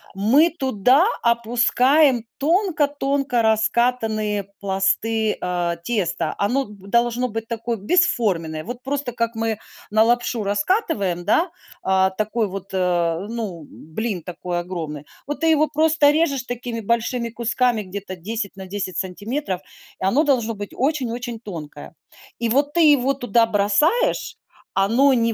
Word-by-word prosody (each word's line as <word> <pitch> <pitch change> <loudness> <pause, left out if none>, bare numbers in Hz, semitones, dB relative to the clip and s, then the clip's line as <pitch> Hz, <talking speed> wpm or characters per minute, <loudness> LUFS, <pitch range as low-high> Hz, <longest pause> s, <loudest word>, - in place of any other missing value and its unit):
мы 270 - +4
туда 265 - +3 0.2
опускаем 240 +3 +3
тонко-тонко 285 - +1
раскатанные 220 -2 +1
пласты, 210 +3 +1
э, 175 -1 -1
теста. 190 -8 -1
Оно 255 +7 +1
д 200 -2 -14
должно 240 +2 +1
быть 225 +1 -5
такое 230 0 -3
бесформенное. 195 - +1
Вот 245 +2 -7
просто 275 -2 -2
как 230 0 -1
мы 225 -1 -1 0.3
на 215 +1 +4
лапшу 240 -1 +1
раскатываем, 200 - 0
да, 335 - +2 0.3
э, 190 0 +3
такой 215 +1 0
вот, 195 0 -7
э, 175 -1 0
ну, 205 -9 -5
блин 185 +4 -5
такой 175 +1 -4
огромный. 160 -5 -6 0.2
Вот 290 +1 -4
ты 325 - +1
его 310 -1 +4
просто 310 0 +3
режешь 295 -4 +1
такими 240 -1 -5
большими 235 +2 -1
кусками 235 0 0
где-то 190 0 -7
10 200 +3 -4
на 190 -1 -9
10 190 -1 -4
сантиметров. 195 +1 -3 0.4
Оно 235 +12 +2
должно 240 -6 +1
быть 205 -1 -7
очень-очень 245 -4 -2
тонкое. 160 -7 -9 0.4
И 235 -1 -1
вот 285 +4 +2
ты 340 - +3
его 275 -3 +4
туда 235 -3 +2
бросаешь, 215 - +1 0.4
оно 235 +8 +4
не 230 -2 +2
230 Hz, 135 wpm, -22 LUFS, 195-260 Hz, 0.4 s, мы